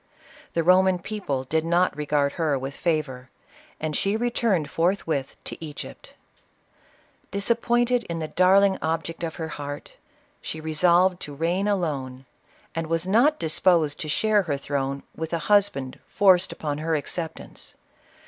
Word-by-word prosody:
The 165 Hz, -, +1 dB
Roman 185 Hz, +1 st, +5 dB
people 175 Hz, -8 st, -3 dB
did 160 Hz, +4 st, 0 dB
not 170 Hz, +1 st, +2 dB
regard 145 Hz, -1 st, +1 dB
her 155 Hz, -4 st, 0 dB
with 135 Hz, +1 st, -5 dB
favor, 140 Hz, -7 st, -2 dB, 0.5 s
and 155 Hz, -1 st, -2 dB
she 200 Hz, +7 st, +1 dB
returned 225 Hz, -8 st, +1 dB
forthwith 165 Hz, -5 st, -1 dB
to -, -, -7 dB
Egypt. 150 Hz, -3 st, -9 dB, 1.1 s
Dis 200 Hz, +3 st, -1 dB
appointed 240 Hz, 0 st, +2 dB
in 170 Hz, -, -4 dB
the 160 Hz, -1 st, -3 dB
darling 190 Hz, +3 st, +4 dB
object 165 Hz, +1 st, -2 dB
of 165 Hz, -1 st, -3 dB
her 160 Hz, -1 st, -5 dB
heart, 145 Hz, -1 st, -7 dB, 0.4 s
she 160 Hz, -, -6 dB
re 155 Hz, 0 st, -4 dB
solved 180 Hz, +2 st, +4 dB
to 145 Hz, -, -8 dB
reign 175 Hz, +6 st, 0 dB
alone, 140 Hz, -10 st, -2 dB, 0.5 s
and 165 Hz, -1 st, -3 dB
wds 165 Hz, +1 st, 0 dB
not 240 Hz, +11 st, +4 dB
disposed 160 Hz, -, +2 dB
to 155 Hz, -, -4 dB
share 215 Hz, +6 st, +3 dB
her 150 Hz, -7 st, -2 dB
throne 140 Hz, -1 st, -3 dB
with 160 Hz, +1 st, -5 dB
a -, -, +2 dB, 0.2 s
husband 190 Hz, -11 st, +2 dB
forced 190 Hz, -2 st, +4 dB
upon 150 Hz, -1 st, -4 dB
her 160 Hz, +1 st, 0 dB
acceptance. 160 Hz, +2 st, -5 dB
165 Hz, 150 wpm, -25 LUFS, 150-190 Hz, 1.1 s, Roman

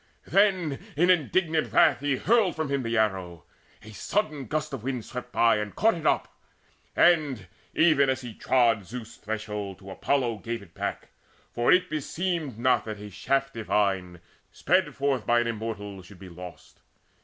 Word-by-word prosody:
Then 185 Hz, -5 st, +2 dB, 0.2 s
in 175 Hz, +4 st, +5 dB
indignant 160 Hz, -1 st, +1 dB
wrath -, -, +5 dB
he 145 Hz, 0 st, 0 dB
hurled 220 Hz, -, +2 dB
from 160 Hz, -2 st, -2 dB
him 140 Hz, -1 st, 0 dB
The 115 Hz, -1 st, -1 dB
arrow: 95 Hz, -6 st, -1 dB, 0.4 s
a 110 Hz, -, -11 dB
sudden 150 Hz, -, -2 dB
gust 155 Hz, +1 st, -2 dB
of 135 Hz, -, -4 dB
wind 125 Hz, -2 st, -3 dB
swept 125 Hz, -1 st, -7 dB
by, 115 Hz, -2 st, +4 dB
And 105 Hz, -1 st, -4 dB
caught 225 Hz, +2 st, +3 dB
it 160 Hz, -3 st, -3 dB
up, -, -, 0 dB, 0.6 s
and, 150 Hz, -, +3 dB, 0.3 s
even 150 Hz, -4 st, +4 dB
as 130 Hz, 0 st, 0 dB
he 120 Hz, -3 st, -8 dB
trod 115 Hz, -3 st, +2 dB
Zeus' 115 Hz, 0 st, -8 dB
threshold, 105 Hz, -2 st, -5 dB
to 95 Hz, 0 st, -11 dB
Apollo 120 Hz, -1 st, 0 dB
gave 115 Hz, 0 st, -5 dB
it 85 Hz, -4 st, -18 dB
back; -, -, -4 dB, 0.4 s
For 120 Hz, -, +2 dB
it 180 Hz, 0 st, +4 dB
beseemed 155 Hz, -, -3 dB
not 125 Hz, +2 st, +2 dB
that 110 Hz, -1 st, -5 dB
a 105 Hz, 0 st, -9 dB
shaft 135 Hz, +7 st, -1 dB
divine, 95 Hz, -5 st, -1 dB, 0.3 s
Sped -, -, +1 dB
forth 135 Hz, -6 st, -1 dB
by 120 Hz, 0 st, +4 dB
an -, -, -1 dB
Immortal, 105 Hz, -4 st, -5 dB
should 95 Hz, +1 st, -15 dB
be 95 Hz, 0 st, -11 dB
lost. 90 Hz, 0 st, -12 dB
120 Hz, 170 wpm, -27 LUFS, 105-150 Hz, 0.6 s, in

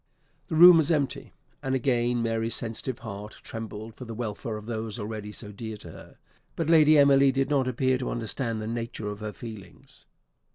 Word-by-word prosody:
The -, -, -3 dB
room 175 Hz, +1 st, +10 dB
was 160 Hz, -1 st, +2 dB
empty; 145 Hz, -5 st, -1 dB, 0.3 s
and 130 Hz, 0 st, -1 dB
again 120 Hz, -2 st, +1 dB
Mary's 115 Hz, 0 st, 0 dB
sensitive 115 Hz, +2 st, -4 dB
heart 105 Hz, -3 st, -8 dB
trembled 110 Hz, 0 st, -7 dB
for 125 Hz, -, -10 dB
the 115 Hz, -1 st, -7 dB
welfare 110 Hz, -1 st, -4 dB
of 105 Hz, -, -10 dB
those 110 Hz, -1 st, -4 dB
already 105 Hz, -1 st, -5 dB
so 105 Hz, 0 st, -7 dB
dear 110 Hz, +1 st, -7 dB
to -, -, -10 dB
her; -, -, -14 dB, 0.4 s
but 165 Hz, -, -2 dB
Lady 155 Hz, -1 st, +6 dB
Emily 140 Hz, -1 st, +6 dB
did 135 Hz, +2 st, -1 dB
not 135 Hz, -3 st, +2 dB
appear 130 Hz, +1 st, +1 dB
to 130 Hz, -, -3 dB
understand 115 Hz, 0 st, -2 dB
the 110 Hz, -, -5 dB
nature 115 Hz, -2 st, -4 dB
of 105 Hz, 0 st, -6 dB
her 110 Hz, -1 st, -5 dB
feelings. 105 Hz, -5 st, -11 dB
115 Hz, 190 wpm, -27 LUFS, 110-135 Hz, 0.4 s, room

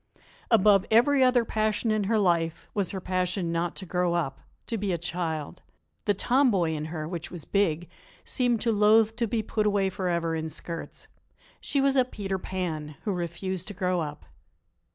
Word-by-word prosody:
Above 205 Hz, -3 st, +5 dB
every 260 Hz, +5 st, +5 dB
other 250 Hz, -2 st, +4 dB
passion 215 Hz, +1 st, 0 dB
of 215 Hz, -2 st, +1 dB
her 220 Hz, +3 st, +2 dB
life 170 Hz, -4 st, +1 dB
was 200 Hz, -4 st, 0 dB
her 190 Hz, -, -3 dB
passion 180 Hz, -1 st, -1 dB
not 170 Hz, 0 st, -1 dB
to 190 Hz, -, -6 dB
grow 180 Hz, -1 st, 0 dB
up, 145 Hz, -6 st, -2 dB, 0.3 s
to 230 Hz, -, -2 dB
be 205 Hz, -3 st, -1 dB
a 175 Hz, -, 0 dB
child. 165 Hz, -2 st, -3 dB, 0.4 s
The 205 Hz, -, +2 dB
tom 255 Hz, +7 st, +3 dB
boy 175 Hz, -7 st, +1 dB
in 155 Hz, -1 st, -3 dB
her, 155 Hz, -1 st, -5 dB
which 170 Hz, -1 st, -5 dB
was 175 Hz, -4 st, -8 dB
big, 175 Hz, -4 st, +1 dB, 0.4 s
seemed 245 Hz, -4 st, +1 dB
to 235 Hz, -, +2 dB
loathe 215 Hz, +1 st, +4 dB
to 235 Hz, -1 st, 0 dB
be 220 Hz, 0 st, -1 dB
put 215 Hz, 0 st, 0 dB
away 200 Hz, -2 st, +2 dB
forever 170 Hz, -3 st, -1 dB
in 160 Hz, 0 st, -2 dB
skirts. 165 Hz, +1 st, -6 dB, 0.5 s
She 280 Hz, -, -1 dB
was 275 Hz, 0 st, +3 dB
a 260 Hz, -, +5 dB
Peter 195 Hz, -6 st, -4 dB
Pan, 160 Hz, -6 st, -4 dB
who 210 Hz, -, -1 dB
refused 180 Hz, +1 st, -3 dB
to 205 Hz, -, -6 dB
grow 180 Hz, -1 st, 0 dB
up. 150 Hz, -2 st, -5 dB
185 Hz, 185 wpm, -27 LUFS, 170-215 Hz, 0.5 s, Above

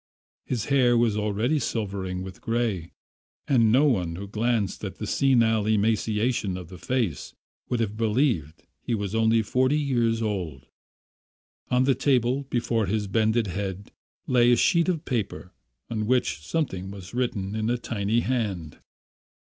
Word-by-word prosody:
His 120 Hz, -5 st, -2 dB
hair 125 Hz, -4 st, +3 dB
was 115 Hz, -3 st, +2 dB
already 105 Hz, +8 st, 0 dB
silvering 95 Hz, -6 st, -3 dB
with 95 Hz, 0 st, -9 dB
grey, 115 Hz, -8 st, -1 dB, 0.6 s
and 115 Hz, -5 st, +4 dB
no 130 Hz, +5 st, +5 dB
one 90 Hz, -, +1 dB
who 100 Hz, +3 st, -6 dB
glanced 110 Hz, -1 st, -1 dB
at 95 Hz, -, -5 dB
the 105 Hz, -, -5 dB
senile 115 Hz, -3 st, +2 dB
emaciation 110 Hz, -1 st, +1 dB
of 90 Hz, -3 st, -9 dB
the 90 Hz, -, -11 dB
face 120 Hz, -, -2 dB, 0.3 s
would 125 Hz, -, 0 dB
have 105 Hz, -1 st, -2 dB
believed 110 Hz, -, 0 dB
that -, -, -36 dB
he 120 Hz, -, -1 dB
was 100 Hz, -2 st, -3 dB
only 110 Hz, 0 st, +3 dB
forty 130 Hz, +6 st, +2 dB
years 120 Hz, -5 st, +1 dB
old. 90 Hz, -, -3 dB, 1.0 s
On 125 Hz, 0 st, +3 dB
the 135 Hz, +1 st, +4 dB
table, 130 Hz, 0 st, +1 dB
before 115 Hz, -4 st, 0 dB
his 105 Hz, +2 st, 0 dB
bended 110 Hz, +3 st, +1 dB
head, 95 Hz, +1 st, -5 dB, 0.3 s
lay 120 Hz, -1 st, +4 dB
a -, -, +6 dB
sheet 170 Hz, -, +3 dB
of 170 Hz, -3 st, -1 dB
paper 105 Hz, -6 st, -3 dB, 0.3 s
on 110 Hz, -2 st, -3 dB
which 125 Hz, -8 st, +1 dB
something 95 Hz, -, -3 dB
was 95 Hz, -1 st, -10 dB
written 120 Hz, -6 st, -2 dB
in 110 Hz, +1 st, -1 dB
a 120 Hz, -, +1 dB
tiny 115 Hz, -1 st, -1 dB
hand. 100 Hz, -, -2 dB
110 Hz, 155 wpm, -26 LUFS, 100-120 Hz, 1.0 s, a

